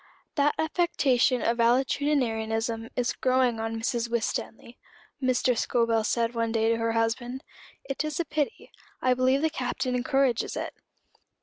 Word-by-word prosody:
"That 290 Hz, 0 st, +2 dB
affectation 280 Hz, -7 st, +2 dB
of 235 Hz, +1 st, +1 dB
valetudinarianism 230 Hz, -3 st, +1 dB
is 245 Hz, -1 st, 0 dB
growing 255 Hz, -3 st, +1 dB
on 225 Hz, 0 st, -3 dB
Mrs. 235 Hz, 0 st, -1 dB
Winstanley," 235 Hz, +1 st, -3 dB, 0.4 s
Mrs. 255 Hz, -2 st, +2 dB
Scobel 230 Hz, -2 st, +1 dB
said 230 Hz, +2 st, 0 dB
one 230 Hz, -1 st, -1 dB
day 225 Hz, 0 st, +2 dB
to 230 Hz, -, +2 dB
her 230 Hz, 0 st, 0 dB
husband. 240 Hz, +3 st, -1 dB, 0.4 s
"It 275 Hz, +2 st, -3 dB
is 305 Hz, 0 st, -3 dB
a 340 Hz, -, 0 dB
pity. 295 Hz, -1 st, -3 dB, 0.3 s
I 255 Hz, -, +3 dB
believe 260 Hz, +3 st, +2 dB
the 320 Hz, -, +2 dB
Captain 255 Hz, -2 st, -2 dB
encourages 255 Hz, -1 st, +1 dB
it." -, -, -4 dB
245 Hz, 140 wpm, -27 LUFS, 230-270 Hz, 0.4 s, I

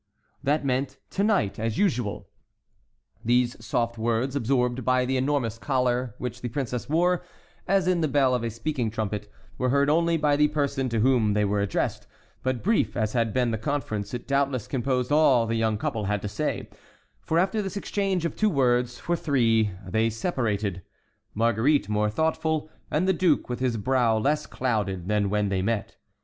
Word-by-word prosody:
That 145 Hz, +1 st, 0 dB
meant: 135 Hz, +1 st, -1 dB
"To 200 Hz, -, 0 dB
night, 200 Hz, -, +1 dB
as 115 Hz, 0 st, -2 dB
usual." 125 Hz, -, 0 dB, 1.0 s
These 120 Hz, +1 st, +1 dB
soft 120 Hz, -1 st, -1 dB
words, 120 Hz, +4 st, 0 dB
absorbed 125 Hz, -1 st, 0 dB
by 130 Hz, +1 st, +2 dB
the 130 Hz, +1 st, -1 dB
enormous 130 Hz, -4 st, 0 dB
collar 125 Hz, -3 st, 0 dB
which 125 Hz, 0 st, -5 dB
the 120 Hz, -, -3 dB
princess 125 Hz, -1 st, -3 dB
wore, 175 Hz, +3 st, +2 dB, 0.4 s
as 195 Hz, -2 st, +2 dB
in 180 Hz, -2 st, +2 dB
the 155 Hz, -, +2 dB
bell 135 Hz, -2 st, +3 dB
of 125 Hz, -, +1 dB
a 115 Hz, -, -1 dB
speaking 120 Hz, +1 st, -2 dB
trumpet, 105 Hz, -1 st, -4 dB, 0.3 s
were 125 Hz, -, +1 dB
heard 140 Hz, +2 st, +3 dB
only 165 Hz, +1 st, +2 dB
by 150 Hz, -2 st, +2 dB
the 150 Hz, 0 st, +5 dB
person 140 Hz, -3 st, -1 dB
to 115 Hz, -2 st, 0 dB
whom 120 Hz, -4 st, +3 dB
they 105 Hz, 0 st, +2 dB
were 100 Hz, 0 st, 0 dB
addressed; 100 Hz, -, -2 dB, 0.3 s
but 130 Hz, -2 st, -2 dB
brief 215 Hz, -, +1 dB
as 110 Hz, -2 st, 0 dB
had 115 Hz, -3 st, +1 dB
been 125 Hz, +1 st, +1 dB
the 110 Hz, -, -2 dB
conference, 110 Hz, -5 st, -3 dB
it 120 Hz, -, -7 dB
doubtless 140 Hz, -3 st, 0 dB
composed 130 Hz, 0 st, -1 dB
all 140 Hz, -6 st, +5 dB
the 115 Hz, -, -2 dB
young 110 Hz, -2 st, +1 dB
couple 110 Hz, 0 st, -2 dB
had 105 Hz, 0 st, -1 dB
to -, -, -2 dB
say, -, -, -3 dB, 0.5 s
for 160 Hz, -, -1 dB
after 190 Hz, +5 st, +2 dB
this 195 Hz, 0 st, -4 dB
exchange 195 Hz, -3 st, -1 dB
of 170 Hz, -, -2 dB
two 215 Hz, -, +2 dB
words 125 Hz, -5 st, +1 dB
for 175 Hz, -, -1 dB
three, 115 Hz, -9 st, +2 dB, 0.2 s
they 110 Hz, +4 st, +1 dB
separated, 110 Hz, -, -2 dB, 0.5 s
Marguerite 115 Hz, +3 st, +2 dB
more 105 Hz, 0 st, +1 dB
thoughtful 160 Hz, +4 st, -1 dB, 0.2 s
and 160 Hz, +5 st, +1 dB
the 190 Hz, -, +4 dB
duke 170 Hz, -7 st, +2 dB
with 125 Hz, -, -3 dB
his 125 Hz, -3 st, 0 dB
brow 120 Hz, 0 st, +2 dB
less 150 Hz, +7 st, 0 dB
clouded 100 Hz, -8 st, -2 dB
than 105 Hz, -1 st, +1 dB
when 105 Hz, 0 st, +1 dB
they 95 Hz, -1 st, 0 dB
met. 105 Hz, +1 st, -2 dB
125 Hz, 185 wpm, -26 LUFS, 110-145 Hz, 1.0 s, the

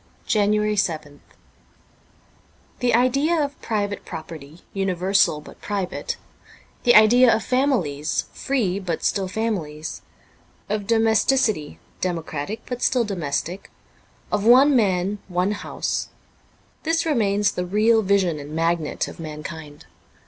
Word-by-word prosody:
'' -, -, -34 dB
JANUARY 210 Hz, 0 st, +2 dB
7th 155 Hz, -6 st, -2 dB, 1.6 s
THE 245 Hz, -2 st, +2 dB
idea 275 Hz, +7 st, +2 dB
of 285 Hz, -1 st, -3 dB
private 205 Hz, -2 st, -2 dB
property 160 Hz, 0 st, -9 dB
universal 190 Hz, -4 st, +1 dB
but -, -, -14 dB
private, 195 Hz, -3 st, -3 dB, 0.7 s
the 240 Hz, -, +6 dB
idea 235 Hz, +3 st, +7 dB
of 225 Hz, -2 st, +1 dB
families 195 Hz, -, 0 dB
free 210 Hz, -9 st, -1 dB
but 175 Hz, -4 st, -3 dB
still 195 Hz, -2 st, 0 dB
families, 180 Hz, -8 st, -3 dB, 0.7 s
of 205 Hz, -1 st, -2 dB
domesticity 225 Hz, -, +2 dB, 0.2 s
democratic 165 Hz, +2 st, -3 dB
but 250 Hz, -1 st, -5 dB
still 250 Hz, -2 st, +2 dB
domestic, 175 Hz, -1 st, -3 dB, 0.6 s
of 205 Hz, -1 st, 0 dB
one 260 Hz, +5 st, +6 dB
man 200 Hz, -2 st, +1 dB
one 180 Hz, +2 st, 0 dB
house 210 Hz, -, -3 dB, 0.4 s
— -, -, -36 dB
this 330 Hz, +1 st, 0 dB
remains 210 Hz, -9 st, +2 dB
the 180 Hz, -, -3 dB
real 215 Hz, +5 st, +3 dB
vision 190 Hz, -6 st, +1 dB
and 145 Hz, +2 st, -8 dB
magnet 165 Hz, -1 st, 0 dB
of -, -, -10 dB
mankind. 155 Hz, -1 st, -8 dB
200 Hz, 120 wpm, -23 LUFS, 165-225 Hz, 1.6 s, idea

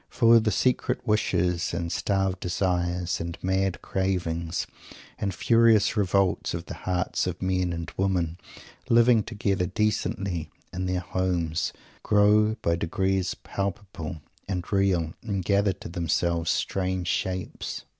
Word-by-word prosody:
For 115 Hz, -1 st, +6 dB
the 110 Hz, -1 st, +1 dB
secret 125 Hz, +5 st, +1 dB
wishes, 90 Hz, -6 st, +1 dB
and 85 Hz, 0 st, -2 dB
starved 95 Hz, 0 st, 0 dB
desires, 90 Hz, -1 st, -1 dB
and 85 Hz, 0 st, -5 dB
mad 95 Hz, 0 st, 0 dB
cravings, 85 Hz, -3 st, -1 dB, 0.5 s
and 100 Hz, -, -1 dB
furious 115 Hz, +2 st, +4 dB
revolts, 100 Hz, -3 st, +1 dB
of 85 Hz, 0 st, -5 dB
the -, -, -7 dB
hearts 90 Hz, 0 st, -1 dB
of 90 Hz, -1 st, -3 dB
men 90 Hz, -1 st, 0 dB
and 85 Hz, -1 st, -5 dB
women, 90 Hz, -3 st, 0 dB, 0.5 s
living 115 Hz, -1 st, +5 dB
together 100 Hz, -4 st, -1 dB
decently 100 Hz, -5 st, -1 dB, 0.2 s
in 90 Hz, 0 st, -2 dB
their 90 Hz, -1 st, 0 dB
"homes," 90 Hz, -3 st, -1 dB, 0.3 s
grow 105 Hz, +1 st, +4 dB
by 85 Hz, 0 st, +2 dB
degrees 95 Hz, +1 st, 0 dB
palpable 95 Hz, -6 st, -4 dB, 0.2 s
and 90 Hz, -3 st, -2 dB
real 95 Hz, -5 st, +2 dB
and 100 Hz, -5 st, -3 dB
gather 100 Hz, 0 st, +3 dB
to -, -, -10 dB
themselves 85 Hz, 0 st, 0 dB
strange 95 Hz, -2 st, -1 dB
shapes. 95 Hz, 0 st, -3 dB
95 Hz, 125 wpm, -26 LUFS, 85-100 Hz, 0.5 s, For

